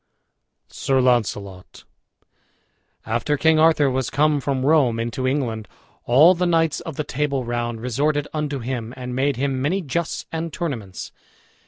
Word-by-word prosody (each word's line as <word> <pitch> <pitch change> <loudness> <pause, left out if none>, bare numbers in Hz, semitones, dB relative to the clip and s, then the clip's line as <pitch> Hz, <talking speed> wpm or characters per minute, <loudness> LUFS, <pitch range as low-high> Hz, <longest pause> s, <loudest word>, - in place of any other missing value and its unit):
SIR 135 -1 0
LAUNCELOT 105 -7 -1 1.2
After 150 - 0
King 160 +2 +3
Arthur 155 -2 +4
was 130 -1 -1
come 150 0 +2
from 135 -1 -1
Rome 135 -7 +3
into 120 +3 -2
England 120 -6 -2 0.4
all 150 +9 +6
the 180 0 0
knights 165 -3 +2
of 160 - -7
the 150 - -2
Table 140 -1 -1
Round 120 -1 -3
resorted 145 +5 0
unto 150 -2 -2
him 120 -1 -5
and 125 -1 -5
made 135 +1 +1
him 135 +1 -1
many 180 +8 0
justs 170 +3 -3
and 165 0 -3
tournaments. 120 - -5
135 Hz, 145 wpm, -22 LUFS, 120-155 Hz, 1.2 s, all